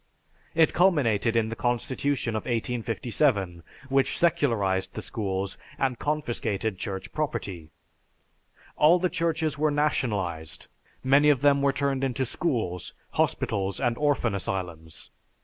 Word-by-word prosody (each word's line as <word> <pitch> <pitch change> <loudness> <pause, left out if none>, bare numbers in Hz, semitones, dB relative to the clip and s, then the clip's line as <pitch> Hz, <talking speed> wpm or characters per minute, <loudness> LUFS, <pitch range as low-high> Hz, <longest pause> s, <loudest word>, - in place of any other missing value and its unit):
It 160 -1 +4
culminated 125 - +3
in 110 -1 +2
the 115 - -4
Constitution 125 0 -1
of 110 - -3
1857, 115 - 0 0.3
which 135 0 +2
secularized 115 - +1
the - - -4
schools 100 -2 -3 0.2
and 130 -3 0
confiscated 115 -9 -2
Church 95 -1 -5
property. 100 - -3 1.1
All 160 +4 +6
the 180 0 0
churches 160 -3 -1
were 155 0 +3
nationalized, 105 - -1 0.4
many 140 +3 +5
of 140 -4 +3
them 140 -1 +4
were 140 0 +3
turned 135 0 -1
into 130 0 0
schools, 115 - -2 0.2
hospitals, 95 0 0
and 120 -1 +1
orphan 145 -6 +1
asylums. 90 -5 -5
120 Hz, 120 wpm, -27 LUFS, 100-145 Hz, 1.1 s, All